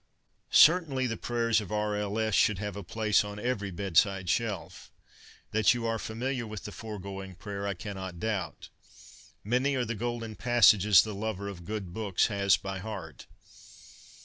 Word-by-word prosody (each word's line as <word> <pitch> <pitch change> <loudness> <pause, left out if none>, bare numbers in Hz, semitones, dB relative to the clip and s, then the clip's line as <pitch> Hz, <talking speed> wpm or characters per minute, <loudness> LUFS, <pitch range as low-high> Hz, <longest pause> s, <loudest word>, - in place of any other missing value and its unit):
Certainly 150 -6 +5
the 115 -2 -2
prayers 115 -1 0
of 105 - -9
R. 105 0 -1
L. 105 0 -2
S. 110 -1 0
should 100 +1 +3
have 105 0 -4
a 100 - -5
place 105 +3 +1
on 105 0 -7
every 105 -3 -2
bedside 95 0 +1
shelf. 110 -6 -3 0.6
That 110 +3 +4
you 120 -1 -3
are 115 0 -1
familiar 120 +2 -3
with 105 -2 -7
the 105 - -7
foregoing 95 -2 -7
prayer, 100 +1 -5
I 100 - -2
cannot 95 -3 -7
doubt. 105 -3 -3 0.4
' - - -18 0.3
Many 125 +6 +1
are 125 -2 0
the 115 - -3
golden 115 0 -4
passages 110 -5 +5
the 110 - -5
lover 100 -1 -4
of 90 -4 -8
good 100 -4 -5
books 105 -4 +1
has 100 -3 +3
by 95 +1 -5
heart.' 95 -7 -8
105 Hz, 170 wpm, -29 LUFS, 100-115 Hz, 0.6 s, Certainly